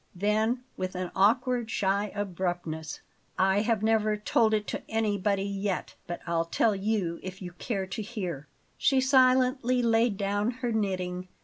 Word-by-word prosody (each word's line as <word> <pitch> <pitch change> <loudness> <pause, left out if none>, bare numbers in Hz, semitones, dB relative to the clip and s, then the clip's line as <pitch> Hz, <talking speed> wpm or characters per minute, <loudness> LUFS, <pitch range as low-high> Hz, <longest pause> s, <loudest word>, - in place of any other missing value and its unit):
Then 215 +6 +1
with 185 0 -3
an 180 -1 -3
awkward, 235 +4 +2
shy 200 -1 0
abruptness: 175 -5 -3 0.4
"I 190 +2 +3
have 220 -1 0
never 215 -1 +2
told 220 +1 +2
it 210 -1 -1
to - - -3
anybody 205 -3 0
yet; 200 -1 -3
but 175 0 -5
I'll 165 -1 0
tell 210 +5 +2
you 195 -4 -1
if 185 0 -7
you 180 -2 -7
care 195 -5 -2
to 195 +3 -5
hear." 185 - -5 0.3
She 270 - +3
silently 255 -1 +3
laid 225 -2 +3
down 205 +2 0 0.2
her 240 - 0
knitting. 185 -4 -2
205 Hz, 150 wpm, -28 LUFS, 185-225 Hz, 0.4 s, I